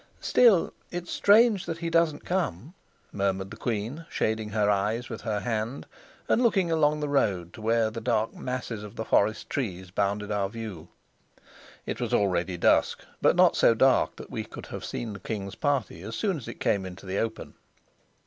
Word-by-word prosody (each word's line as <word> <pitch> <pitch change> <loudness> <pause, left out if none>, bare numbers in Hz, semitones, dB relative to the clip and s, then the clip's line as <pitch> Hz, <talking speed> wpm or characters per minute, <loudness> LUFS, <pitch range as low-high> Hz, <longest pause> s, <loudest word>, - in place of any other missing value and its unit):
"Still 225 -9 +4 0.2
it's 175 0 -5
strange 210 -1 +4
that 165 - -3
he 170 0 -3
doesn't 165 -3 +2
come," 160 - -2 0.4
murmured 95 -1 -1
the - - -7
queen, 120 +8 -3
shading 110 -1 -1
her 105 -1 +1
eyes 105 +4 0
with - - -6
her 105 -3 -2
hand, 115 +4 -3 0.4
and - - +3
looking 195 -8 +2
along 150 -2 +2
the 150 - -1
road 100 -11 0
to 110 - -11
where 115 0 +2
the 115 +1 -6
dark 115 -2 0
masses 125 -4 -4
of 105 -1 -10
the 110 - -4
forest 110 +1 +2
trees 95 -9 -4
bounded 105 +1 -1
our 100 -2 0
view. 105 -7 -7 1.0
It - - -4
was - - 0
already 90 -2 +1
dusk, - - +2 0.2
but - - +4
not - - +5
so 115 - +5
dark 130 +3 +4
but - - -9
that - - -18
we - - -3
could - - -10
have - - -7
seen 115 -3 -4
the 100 - -8
king's 100 -3 -5
party 135 - -1
as 110 +4 -6
soon 200 -4 0
as 130 - -9
it - - -8
came 100 -3 +1
into 95 +1 -9
the 95 +1 -2
open. 115 -1 -3
110 Hz, 190 wpm, -27 LUFS, 100-145 Hz, 1.0 s, not